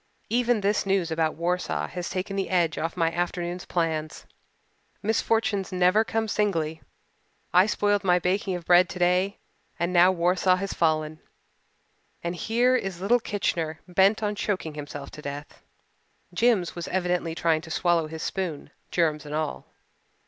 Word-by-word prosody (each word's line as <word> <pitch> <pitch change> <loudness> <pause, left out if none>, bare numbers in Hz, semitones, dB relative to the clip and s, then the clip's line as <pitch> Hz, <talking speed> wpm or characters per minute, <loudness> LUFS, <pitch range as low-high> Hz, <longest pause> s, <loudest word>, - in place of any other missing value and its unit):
Even 240 -2 +2
this 205 +1 +1
news 190 -4 0
about 160 -1 0
Warsaw 180 +2 -1
has 180 -1 -5
taken 185 +2 -3
the 195 -1 -2
edge 175 -3 +1
off 165 +2 -3
my 165 -1 +2
afternoon's 175 +1 -3
plans. 160 -3 -2 0.8
Misfortunes 220 -2 0
never 185 +4 +4
come 225 0 -1
singly. 165 -8 -1 0.7
I 185 +3 +6
spoiled 205 -1 +1
my 180 -2 +4
baking 185 +1 0
of 175 -2 -7
bread 180 +1 +5
today 180 +2 +1 0.4
and 170 +2 -1
now 180 +1 +6
Warsaw 180 +1 +2
has 195 +1 -3
fallen 155 -1 0 1.0
and 170 +1 -2
here 240 +7 +2
is 195 -7 -2
little 220 +6 +3
Kitchener 165 -7 -2
bent 195 +4 +3
on 210 0 0
choking 190 -6 -2
himself 145 -1 -7
to 150 - -10
death." 145 0 -7 0.7
Jims 210 -3 +2
was 170 -1 -5
evidently 180 -3 -1
trying 160 -2 +1
to 160 - -11
swallow 170 -1 +1
his 160 0 -7
spoon, 180 -6 -4 0.2
germs 155 -3 +1
and 150 0 -6
all. 155 -1 -3
180 Hz, 150 wpm, -26 LUFS, 165-195 Hz, 1.0 s, I